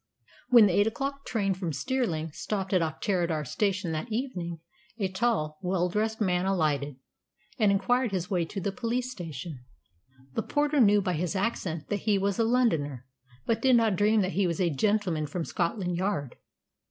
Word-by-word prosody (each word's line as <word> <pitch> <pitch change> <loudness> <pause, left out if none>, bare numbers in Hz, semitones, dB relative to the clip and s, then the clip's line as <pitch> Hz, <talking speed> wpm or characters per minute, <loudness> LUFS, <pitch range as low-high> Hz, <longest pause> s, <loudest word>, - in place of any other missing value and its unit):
When 235 -3 +8
the 190 - +2
eight 205 +3 +4
o'clock 275 +4 -3
train 200 -4 0
from 180 -3 -3
Stirling 170 - -1
stopped 195 +4 -3
at 185 - +4
Auchterarder 165 -1 -1
Station 190 - -1
that 160 +9 -4
evening, 190 -9 -3 0.4
a 200 -4 0
tall, 185 -6 -1
well 180 -1 0
dressed 220 +4 -1
man 185 -3 +1
alighted, 150 -7 0 0.6
and 210 -3 +4
inquired 235 +5 +1
his 180 -2 -2
way 180 -4 0
to 195 - -5
the 195 +1 -2
police 245 +3 -2
station. 165 - -7 0.7
The - - 0
porter 295 0 +1
knew 205 -4 +5
by 180 - 0
his 175 +3 -2
accent 190 -6 -2
that 205 - 0
he 205 -2 +4
was 200 +1 0
a - - +4
Londoner, 165 - +1 0.4
but 225 -1 0
did 260 0 +5
not 225 -4 +3
dream 210 +2 +3
that 185 0 0
he 195 -1 +2
was 170 -2 -2
"a 175 -3 +2
gentleman 180 -2 +1
from 165 +3 -3
Scotland 180 0 -1
Yard." 180 -7 -2
195 Hz, 180 wpm, -28 LUFS, 170-220 Hz, 0.7 s, When